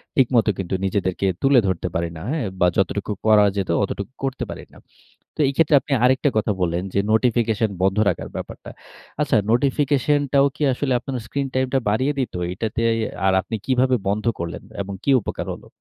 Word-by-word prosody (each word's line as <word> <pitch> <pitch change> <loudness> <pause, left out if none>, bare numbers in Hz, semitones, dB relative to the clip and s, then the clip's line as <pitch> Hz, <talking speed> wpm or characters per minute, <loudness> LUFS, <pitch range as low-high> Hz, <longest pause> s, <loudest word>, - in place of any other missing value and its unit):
ঠিকমত 125 -4 +3
কিন্তু 95 0 -2
নিজেদেরকে 95 -1 -1 0.2
তুলে 135 -2 +5
ধরতে 90 -1 -1
পারি 85 0 -1
না। - - -9
হ্যা? 160 - -1 0.2
বা 90 - +4
যতটুকু 100 +2 0
করা 105 -1 +6
যেত 95 -2 -2
অতটুকু 100 +4 -4
করতে 135 -1 -2
পারি - - -7
না। - - -16 0.6
তো - - -21
এই 135 - +1
ক্ষেত্রে 160 -2 +4
আপনি 145 - -10
আরেকটা 130 +3 +3
কথা 110 0 +1
বললেন 85 +1 0
যে 100 - +2
নোটিফিকেশন 115 -1 +2
বন্ধ 95 +1 +2
রাখার 90 - -4
ব্যাপারটা। - - -7 0.5
আচ্ছা 145 - +1 0.2
নোটিফিকেশন 140 +2 +2
টাও 140 0 +5
কি - - -13
আসলে 130 0 -1
আপনার 130 0 -5
স্ক্রিন 140 +3 -2
টাইম 130 0 +1
টা 135 - +4
বাড়িয়ে 130 +7 +1
দিতো? 125 -8 -2 0.2
এটাতে 110 +4 -3
এ - - 0 0.3
আর 95 - +4
আপনি 110 - -5
কিভাবে 130 0 +2
বন্ধ 105 +2 -1 0.2
করলেন? 85 0 -5 0.2
এবং 100 0 -5
কি 140 - +3
উপকার - - -5
হলো? - - -12
115 Hz, 190 wpm, -22 LUFS, 95-135 Hz, 0.6 s, করা